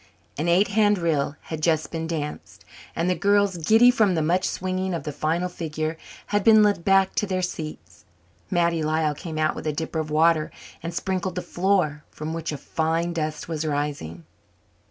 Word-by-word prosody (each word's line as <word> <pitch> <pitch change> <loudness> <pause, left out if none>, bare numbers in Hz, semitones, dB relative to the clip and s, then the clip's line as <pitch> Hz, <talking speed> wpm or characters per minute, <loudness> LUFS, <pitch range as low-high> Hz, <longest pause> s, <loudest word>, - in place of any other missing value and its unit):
An 155 +4 -2
eight 180 +4 +4
hand 205 0 +3
reel 155 -4 0
had 160 -1 -6
just 155 -1 +1
been 165 -1 -3
danced 150 -3 -5 0.3
and 165 - 0
the 185 - +3
girls, 200 +1 +2
giddy 220 +9 +6
from 215 -7 +2
the 160 - +1
much 180 +4 +1
swinging 185 0 -2
of 165 - -4
the 150 - -4
final 160 +5 -1
figure, 155 -2 -4 0.4
had 205 -1 +2
been 215 0 +7
led 200 -4 +2
back 195 0 +3
to 210 - 0
their 185 -1 -1
seats. 155 - -6 0.5
Mattie 170 -3 +1
Lyall 155 0 +1
came 155 +2 -7
out 155 0 +1
with - - -6
a - - +2
dipper 160 +1 -3
of 155 -1 -3
water 155 0 +3 0.3
and 170 - -4
sprinkled 185 0 -2
the 180 - -3
floor, 175 -5 0
from 155 +1 -6
which 165 -1 -3
a 150 - -4
fine 165 +4 -1
dust 155 -2 -3
was 160 -2 -3
rising. 145 - -3
165 Hz, 190 wpm, -24 LUFS, 155-185 Hz, 0.5 s, been